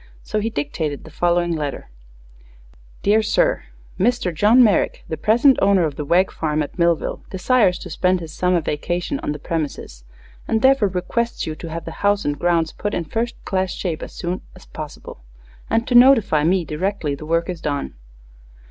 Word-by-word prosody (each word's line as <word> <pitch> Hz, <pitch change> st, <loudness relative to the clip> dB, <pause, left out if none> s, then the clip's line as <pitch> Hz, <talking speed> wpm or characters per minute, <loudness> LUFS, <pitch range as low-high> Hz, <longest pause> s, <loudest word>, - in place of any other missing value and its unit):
So 215 Hz, -, -2 dB
he 220 Hz, +2 st, -1 dB
dictated 145 Hz, -4 st, -3 dB
the 160 Hz, -, -13 dB
following 175 Hz, +1 st, +1 dB
letter: 150 Hz, -, -4 dB, 1.1 s
Dear 215 Hz, +2 st, +4 dB
Sir: -, -, +1 dB, 0.3 s
_Mr. 210 Hz, -3 st, +1 dB
John 215 Hz, +10 st, +5 dB
Merrick, 210 Hz, -5 st, +2 dB
the 160 Hz, -, -3 dB
present 240 Hz, -, +4 dB
owner 195 Hz, -2 st, +4 dB
of 150 Hz, -3 st, -3 dB
the 150 Hz, -, -4 dB
Wegg 180 Hz, +6 st, +2 dB
farm 155 Hz, -1 st, -1 dB
at 145 Hz, -, -9 dB
Millville, 170 Hz, -1 st, +1 dB
desires 190 Hz, 0 st, +2 dB
to -, -, -9 dB
spend 180 Hz, +3 st, +1 dB
his 165 Hz, -2 st, -8 dB
summer 180 Hz, -1 st, +1 dB
vacation 175 Hz, -, -2 dB
on -, -, -3 dB
the 150 Hz, -, -4 dB
premises, 145 Hz, -, -5 dB, 0.4 s
and 220 Hz, +1 st, 0 dB
therefore 265 Hz, -5 st, +5 dB
requests 215 Hz, +6 st, -2 dB
you 155 Hz, -, -3 dB
to 165 Hz, +2 st, -8 dB
have 165 Hz, +1 st, -6 dB
the -, -, -6 dB
house 205 Hz, 0 st, +2 dB
and 145 Hz, 0 st, -1 dB
grounds 170 Hz, -2 st, +1 dB
put 205 Hz, -, -4 dB
in 170 Hz, -, -1 dB
first 230 Hz, +9 st, -2 dB
class 190 Hz, -1 st, -1 dB
shape 170 Hz, -4 st, -3 dB
as -, -, -7 dB
soon 180 Hz, +1 st, -4 dB
as 185 Hz, -, -15 dB
possible, 150 Hz, -, -9 dB, 0.5 s
and 230 Hz, +1 st, +1 dB
to 250 Hz, -, -1 dB
notify 240 Hz, -, +6 dB
me 175 Hz, +2 st, +2 dB
directly 155 Hz, 0 st, -2 dB
the 150 Hz, +2 st, -8 dB
work 165 Hz, +1 st, +1 dB
is 175 Hz, -3 st, -5 dB
done. 145 Hz, -3 st, -3 dB
180 Hz, 185 wpm, -21 LUFS, 155-210 Hz, 1.1 s, notify